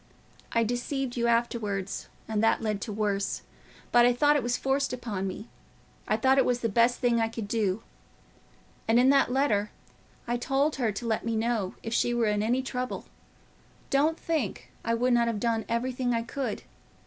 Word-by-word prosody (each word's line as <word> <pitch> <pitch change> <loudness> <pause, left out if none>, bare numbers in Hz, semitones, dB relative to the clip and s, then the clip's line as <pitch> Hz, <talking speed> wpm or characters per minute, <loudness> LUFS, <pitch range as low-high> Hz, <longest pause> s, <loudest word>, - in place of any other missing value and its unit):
I 230 - +2
deceived 245 +2 -2
you 235 -1 +1
afterwards—and 220 -2 -2
that 225 - +4
led 215 -2 0
on - - -15
to 215 - -5
worse; 205 -1 -1 0.5
but 240 0 +6
I 245 0 +5
thought 295 +3 +4
it 290 - +2
was 245 +1 0
forced 270 0 0
upon 215 -6 -3
me, 200 +4 -6 0.6
I - - +2
thought 265 0 +4
it - - +5
was 245 -1 0
the 230 - 0
best 235 +3 +3
thing 240 -2 +2
I 225 - +2
could 225 -2 -5
do. 210 -1 0 1.0
And 225 +2 +4
in 260 +2 +6
that 275 -3 +3
letter 230 -6 +1 0.6
I 240 +1 0
told 270 +5 0
her 235 -5 +1
to 205 +4 -6
let 220 -1 0
me 230 -1 -1
know 220 -4 -1
if 225 - -4
she 240 0 +2
were 235 -1 +2
in 210 -1 +1
any 245 +4 +1
trouble: 255 -1 -4 0.9
don't 300 +4 +2
think 305 - -2
I 230 - +1
would 245 +2 +2
not 235 -1 +3
have 225 -3 -1
done 225 -1 0
everything 245 +1 0
I 230 - 0
could. 235 -2 -4
235 Hz, 190 wpm, -28 LUFS, 220-250 Hz, 1.0 s, but